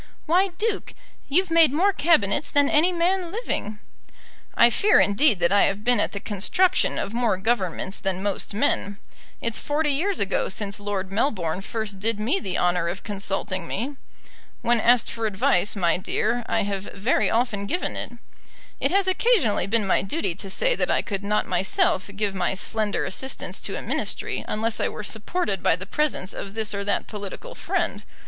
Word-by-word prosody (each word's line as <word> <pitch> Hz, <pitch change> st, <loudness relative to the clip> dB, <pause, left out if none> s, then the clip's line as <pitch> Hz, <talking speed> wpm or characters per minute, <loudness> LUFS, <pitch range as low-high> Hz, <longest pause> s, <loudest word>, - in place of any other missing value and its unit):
"Why, 360 Hz, +5 st, +3 dB
Duke, 430 Hz, 0 st, -2 dB, 0.3 s
you've 360 Hz, +5 st, +2 dB
made 330 Hz, -4 st, +6 dB
more 375 Hz, +8 st, +2 dB
Cabinets 295 Hz, -, +2 dB
than 285 Hz, -1 st, +3 dB
any 325 Hz, +5 st, +4 dB
man 355 Hz, 0 st, 0 dB
living." 285 Hz, -, -3 dB, 0.8 s
"I 235 Hz, 0 st, +7 dB
fear, 410 Hz, -, +4 dB
indeed, 205 Hz, +1 st, +3 dB
that 170 Hz, -, +3 dB
I 205 Hz, -, +5 dB
have 200 Hz, +1 st, -2 dB
been 245 Hz, -1 st, +3 dB
at -, -, +1 dB
the 200 Hz, -, -5 dB
construction 210 Hz, -, +1 dB
of 200 Hz, -, -3 dB
more 235 Hz, -5 st, +1 dB
Governments 190 Hz, -2 st, -1 dB
than 190 Hz, -1 st, -2 dB
most 200 Hz, 0 st, -1 dB
men. 205 Hz, -4 st, 0 dB, 0.4 s
It's 230 Hz, -1 st, -1 dB
forty 295 Hz, +1 st, 0 dB
years 360 Hz, +8 st, 0 dB
ago -, -, 0 dB
since 205 Hz, -1 st, -3 dB
Lord 200 Hz, -2 st, -3 dB
Melbourne 195 Hz, -, -1 dB
first 210 Hz, -1 st, -5 dB
did 220 Hz, +1 st, 0 dB
me 245 Hz, -, 0 dB
the 190 Hz, -, -3 dB
honour 175 Hz, -1 st, +1 dB
of 180 Hz, +3 st, -4 dB
consulting 195 Hz, -3 st, -3 dB
me. 260 Hz, +8 st, -3 dB, 0.7 s
When 240 Hz, 0 st, +3 dB
asked 240 Hz, +2 st, +3 dB
for 230 Hz, -1 st, -2 dB
advice, 195 Hz, -1 st, +1 dB
my 175 Hz, -4 st, +2 dB
dear, 235 Hz, +5 st, -1 dB
I -, -, +1 dB
have 200 Hz, -1 st, -3 dB
very 205 Hz, +6 st, +1 dB
often 220 Hz, -4 st, 0 dB
given 355 Hz, -, -1 dB
it. -, -, -4 dB, 0.7 s
It 275 Hz, -, +1 dB
has 390 Hz, +3 st, +3 dB
occasionally 370 Hz, -, +2 dB
been 220 Hz, 0 st, +3 dB
my 195 Hz, -, +2 dB
duty 195 Hz, -, -2 dB
to 195 Hz, +3 st, -8 dB
say -, -, +2 dB
that -, -, 0 dB
I -, -, +2 dB
could 200 Hz, -2 st, -4 dB
not 210 Hz, +1 st, +1 dB
myself 185 Hz, +1 st, +1 dB
give 205 Hz, -1 st, -1 dB
my 185 Hz, 0 st, -1 dB
slender 205 Hz, +3 st, -1 dB
assistance 265 Hz, +8 st, -2 dB
to -, -, -4 dB
a -, -, -6 dB
Ministry -, -, -2 dB
unless 225 Hz, +1 st, -1 dB
I -, -, 0 dB
were 210 Hz, -, -7 dB
supported 210 Hz, -, -2 dB
by -, -, +3 dB
the 185 Hz, +2 st, -8 dB
presence 260 Hz, -5 st, -1 dB
of 195 Hz, +1 st, -7 dB
this 220 Hz, -2 st, -1 dB
or 200 Hz, 0 st, -3 dB
that 200 Hz, -, +1 dB
political 210 Hz, -, -7 dB
friend. -, -, -2 dB
215 Hz, 180 wpm, -24 LUFS, 195-290 Hz, 0.8 s, I